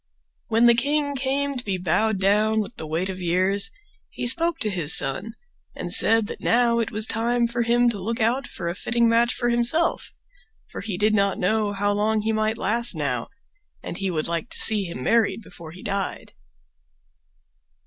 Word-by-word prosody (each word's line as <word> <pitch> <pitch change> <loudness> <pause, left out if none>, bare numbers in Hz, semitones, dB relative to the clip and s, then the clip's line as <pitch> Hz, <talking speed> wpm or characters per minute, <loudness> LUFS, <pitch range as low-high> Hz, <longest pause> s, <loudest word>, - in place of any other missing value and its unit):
When 225 +1 +2
the 235 - +6
king 285 +4 0
came 275 +1 -2
to 250 - -5
be 195 -4 -3
bowed 195 +4 0
down 210 +3 +1
with 215 +3 -5
the 160 - -6
weight 165 +4 -2
of 185 -1 -6
years 185 +4 +1 0.4
he - - -6
spoke 330 +7 +2
to 215 - -1
his 170 -5 +5
son, 145 - +1 0.4
and - - -1
said 225 -1 +6
that - - -8
now 235 0 +2
it 230 - -2
was 215 +1 -3
time 235 +2 0
for 235 +1 -3
him 240 +1 +2
to 205 -4 -7
look 230 +5 -4
out 240 +5 0
for - - -7
a 170 - -2
fitting 235 +4 0
match 235 +1 +2
for 240 - -1
himself, 240 +8 0 0.5
for - - -9
he 200 -3 -5
did 215 +2 +1
not 200 -2 +1
know 215 +2 0
how 205 0 -1
long 215 +1 0
he 220 +1 -1
might 215 0 -1
last 235 -2 +2
now, 135 -6 -3 0.6
and - - -7
he 195 -1 -2
would 160 -4 -2
like 170 +7 -3
to - - -3
see 210 -3 +6
him 170 -8 -7
married 220 - +1
before 170 -4 -12
he 180 +4 -13
died. 200 -2 -4
220 Hz, 195 wpm, -23 LUFS, 190-235 Hz, 0.6 s, the